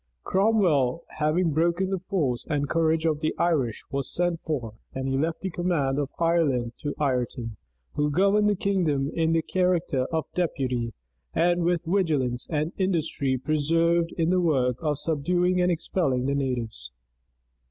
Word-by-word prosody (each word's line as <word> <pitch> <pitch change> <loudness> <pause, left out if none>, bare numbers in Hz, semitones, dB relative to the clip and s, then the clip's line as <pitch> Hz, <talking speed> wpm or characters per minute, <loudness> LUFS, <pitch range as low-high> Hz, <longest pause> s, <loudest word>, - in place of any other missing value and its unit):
Cromwell, 175 - +2 0.2
having 160 +3 +2
broken 170 +5 +1
the 190 - 0
force 155 -10 -1
and 145 -2 0
courage 160 +1 +1
of 155 -2 +1
the 155 0 -1
Irish, 145 -10 0
was 140 0 -2
sent 175 -1 0
for; 125 -9 -3 0.2
and 130 0 -2
he 135 - 0
left 160 +4 -1
the 190 - -3
command 165 -6 0
of 145 -1 -1
Ireland 150 -8 +1
to 145 - -4
Ireton, 125 -5 -2 0.4
who 150 0 +1
governed 200 +6 +3
that 205 -3 0
kingdom 155 -8 +1
in 165 0 +1
the 165 -1 +2
character 175 -8 0
of 160 -1 -1
deputy, 130 -9 -1 0.4
and 175 0 +2
with 175 0 +1
vigilance 150 -9 0
and 155 +1 -1
industry 160 -8 0
persevered 165 +4 +1
in 165 0 +2
the 185 0 +3
work 130 -7 +1
of 150 -3 0
subduing 175 +4 +1
and 180 0 +3
expelling 155 -6 0
the 140 - +1
natives. 120 - -3
160 Hz, 155 wpm, -26 LUFS, 135-175 Hz, 0.4 s, governed